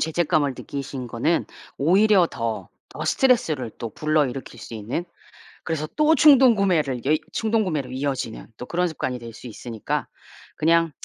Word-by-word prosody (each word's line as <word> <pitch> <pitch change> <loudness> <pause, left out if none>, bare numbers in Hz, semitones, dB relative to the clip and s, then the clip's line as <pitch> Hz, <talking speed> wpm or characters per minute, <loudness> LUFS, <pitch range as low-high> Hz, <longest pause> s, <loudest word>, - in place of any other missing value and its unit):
죄책감을 155 -4 +1
느끼신 135 -2 -6
거는 120 +9 0 0.3
오히려 190 +4 +4
더, 115 -1 -4 0.2
더 - - -7
스트레스를 230 - +2
또 115 - -5
불러일으킬 140 -5 -1
수 115 - -9
있는 110 +11 -3 0.6
그래서 155 -2 -2
또 305 +1 +4
충동구매를 200 - +4
여이 155 +3 +3
충동구매로 190 - 0
이어지는 130 -4 -3
또 125 - -8
그런 180 +4 0
습관이 130 -5 -3
될 115 -1 -9
수 110 - -12
있으니까 115 -1 -4 0.5
그냥 165 +1 +3
155 Hz, 335 characters per minute, -23 LUFS, 125-180 Hz, 0.6 s, 오히려